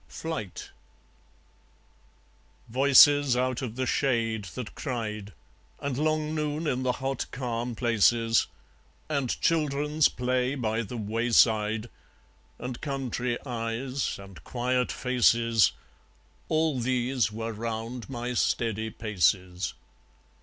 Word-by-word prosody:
Flight 160 - -6 2.0
Voices 140 +1 +6
out 130 0 0
of 120 -4 -5
the 130 +1 -1
shade 115 -6 0
that 125 -3 -6
cried, 105 -6 -4 0.5
And 140 -2 -3
long 155 +2 0
noon 150 +1 -2
in 130 -4 0
the 130 -1 +1
hot 135 0 -3
calm 120 -2 -3
places, 115 0 +3 0.6
And 140 -5 -1
children's 150 -1 +2
play 125 +1 0
by 110 -3 -1
the 115 +2 -6
wayside, 110 0 +2 0.7
And 125 -1 -6
country 125 -4 -2
eyes, 125 +2 -2
and 100 -2 -12
quiet 125 0 0
faces 115 -4 +3 0.8
All 155 -4 +1
these 125 -2 0
were 115 +1 -4
round 115 +2 -5
my 120 -1 -3
steady 110 -2 0
paces. 95 -4 0
125 Hz, 105 wpm, -28 LUFS, 115-135 Hz, 2.0 s, Voices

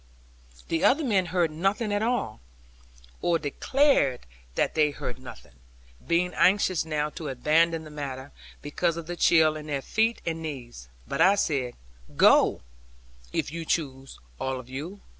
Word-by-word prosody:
The 165 0 0
other 290 +5 +4
men 200 -8 +1
heard 175 -2 +1
nothing 195 +7 -1
at 205 - 0
all; 230 - -1 0.8
or 170 -1 +2
declared 150 - +1 0.3
that - - +1
they 155 -1 +3
heard 130 -3 -6
nothing, 125 - -12 0.6
being 180 +2 +1
anxious 185 -2 +3
now 150 -1 -2
to 160 -1 -7
abandon 160 +5 +2
the 155 - -11
matter, 140 -2 -6 0.3
because 165 +3 -1
of 170 - -6
the 175 +2 -5
chill 160 -2 +4
in 155 0 -8
their 140 -3 -3
feet 225 +1 +1
and 165 -1 -3
knees. 125 - -7 0.2
But - - -2
I 195 +2 +6
said, 135 -10 -1 0.4
'Go, - - +5 0.7
if - - -2
you 165 +1 -5
choose 135 -5 -3 0.2
all 130 -1 -2
of 125 - -11
you. 165 +10 -7
160 Hz, 155 wpm, -26 LUFS, 140-180 Hz, 0.8 s, I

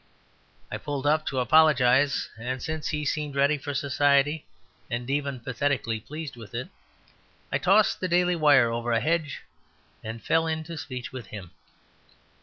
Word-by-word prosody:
I - - -4
pulled 145 -2 -4
up 155 +1 +2
to 135 - -2
apologize, 135 -1 +4
and 125 +4 -4
since 155 +3 -4
he 150 -1 -2
seemed 145 0 -2
ready 140 +2 +2
for 145 0 -5
society, 145 +2 +2 0.4
and 120 +1 -3
even 140 -2 -1
pathetically 125 -2 -1
pleased 150 +3 -7
with 115 -5 -11
it, - - -4 0.8
I - - +1
tossed 200 +3 +3
the 185 - -1
Daily 180 0 +2
Wire 145 -7 +5
over 120 0 -1
a 115 - +3
hedge 155 +1 -1 0.6
and 110 +1 -6
fell 165 +7 +1
into 160 +1 -3
speech 130 -5 -6
with 125 -5 -7
him. 95 -5 -9
140 Hz, 155 wpm, -26 LUFS, 125-155 Hz, 0.8 s, Wire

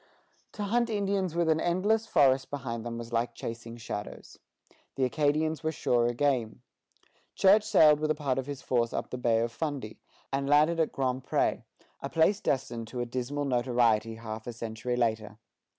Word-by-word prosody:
To 210 - -4
hunt 235 +3 +1
Indians 200 -5 -1
with 170 -1 +1
an 160 0 +3
endless 205 +6 +1
forest 135 -5 +3
behind 120 -5 -4
them 115 0 -5
was 120 0 -8
like 115 0 -1
chasing 115 0 -7
shadows. 105 -2 -7 0.6
The 135 - 0
Acadians 150 +5 0
were 160 0 -1
surer 120 -5 +1
game. 120 -5 -1 0.7
Church 200 +2 +5
sailed 150 -7 +5
with 155 0 -1
a 155 - +2
part 140 -3 -1
of 130 - -5
his 140 -2 -6
force 120 -2 0
up - - -4
the 125 - -4
Bay 115 -2 +2
of 115 0 -1
Fundy, 140 -5 -4 0.3
and 140 0 -1
landed 155 +3 +4
at 160 - +1
Grand 130 -1 -2
Pré, - - 0 0.4
a - - -4
place 170 +5 +3
destined 120 - -2
to 125 - -6
a - - -1
dismal 130 +4 -3
notoriety 120 -4 +1
half 110 0 -7
a 120 - -4
century 115 +2 -4
later. 110 -3 -1
130 Hz, 180 wpm, -29 LUFS, 115-155 Hz, 0.7 s, Church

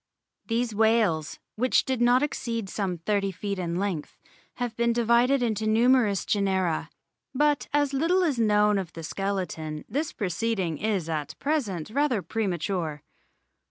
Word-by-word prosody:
These 230 0 0
whales, 215 -8 +2 0.2
which 255 +3 +2
did 260 -2 -1
not 245 +3 +4
exceed 230 -7 -3
some 190 -4 -2
thirty 195 +3 0
feet 200 +1 -4
in 170 -1 -2
length, 185 -5 -3 0.4
have 245 -3 -3
been 235 0 +2
divided 240 +3 +3
into 220 -2 -1
numerous 225 -3 +3
genera; 190 -5 0 0.5
but 295 0 +2
as 290 -1 +1
little 340 +7 +2
is 290 -8 0
known 210 -2 +3
of 180 -3 -6
the 165 - -8
skeleton 165 -5 -3
this 295 +3 -2
proceeding 195 -4 -2
is 200 -6 -1
at 155 -3 -4
present 215 - -2
rather 260 -6 +1
premature. 175 -7 -2
215 Hz, 140 wpm, -26 LUFS, 185-245 Hz, 0.5 s, not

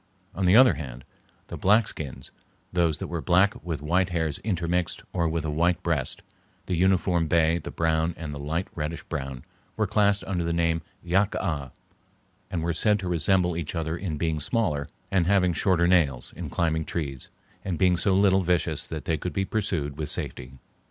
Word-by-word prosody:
On 95 - -1
the 90 +3 +5
other 130 +1 +8
hand, 65 -4 -8 0.4
the - - -7
black 105 +3 +4
skins, 65 -3 -7 0.4
those 85 -4 +2
that - - -5
were 85 -2 -3
black 95 +5 +2
with 80 -5 -4
white 90 +4 +2
hairs 80 -4 -1
intermixed 90 -3 -1
or 85 -3 +1
with 80 -1 -2
a 75 - -1
white 85 +3 +1
breast, 80 -6 -1 0.4
the 90 - -1
uniform 90 -1 +2
bay, 80 +1 +3
the - - -7
brown, 80 0 0
and 75 -2 -6
the 70 - -6
light 80 +5 -2
reddish 75 0 -4
brown, 65 -5 -5 0.3
were 110 - +2
classed 100 0 +2
under 90 -3 -2
the 85 - -1
name 85 -1 +1 0.2
yack 95 +4 +1
ah, 75 -8 -2 0.8
and 85 - -2
were 85 +1 0
said 105 +5 +3
to 95 -3 -5
resemble 90 +1 +2
each 85 0 -4
other 80 -1 -2
in 85 -3 -4
being 80 -1 -1
smaller 75 - -1 0.2
and 90 -3 +2
having 95 -2 +3
shorter 90 -1 +2
nails, 75 -9 +2
in 80 -1 -6
climbing 80 0 0
trees, 70 -6 -5 0.3
and 90 -4 -2
being 90 0 +4
so 95 +3 +1
little 95 -1 +4
vicious 85 -4 0
that 80 -3 -6
they 80 -2 0
could 90 +1 -4
be 95 +5 0
pursued 80 -10 -1
with 75 - -3
safety. 65 +1 -4
85 Hz, 190 wpm, -26 LUFS, 80-95 Hz, 0.8 s, other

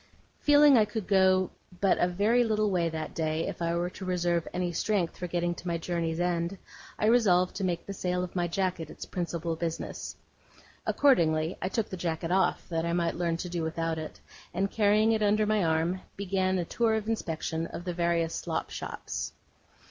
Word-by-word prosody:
Feeling 290 0 +6
that 245 - +7
I 215 - +5
could 210 -1 -4
go 190 -1 +4 0.3
but 195 -2 +3
a 175 - +4
very 210 +7 +3
little 215 -2 +1
way 170 -3 +1
that 160 -1 -5
day, 160 0 -1
if - - -6
I 170 0 0
were 175 +1 -1
to 190 - -9
reserve 175 -2 0
any 180 -1 -1
strength 180 0 0
for 180 - -5
getting 175 0 0
to 175 - -9
my 170 -1 0
journey's 165 -1 -2
end, 175 +1 0 0.4
I - - 0
resolved 200 -6 +4
to 195 - -3
make 175 -2 -1
the 200 - -5
sale 180 -1 -1
of 180 - -7
my 175 -1 +1
jacket 175 -3 -2
its - - -8
principal 170 -2 -3
business. 165 0 -4 0.7
Accordingly, 165 - +3
I 185 - -1
took 215 +2 -1
the 185 - -5
jacket 165 -1 -2
off, 190 +1 +1
that 165 -1 -1
I 170 0 -1
might 170 -1 +1
learn 170 -1 0
to 180 +1 -5
do 170 -1 -2
without 160 0 -2
it; 155 - -7 0.4
and 195 +1 0
carrying 215 +1 +4
it 220 -1 +1
under 210 +1 +3
my 215 -2 +2
arm, 165 +3 +1 0.2
began 190 -1 0
a 175 - -1
tour 225 +4 +1
of 220 -1 -2
inspection 165 -6 -2
of 175 - -7
the 180 -1 -3
various 170 -1 +1
slop - - -3
shops. - - -5
180 Hz, 200 wpm, -29 LUFS, 170-200 Hz, 0.7 s, that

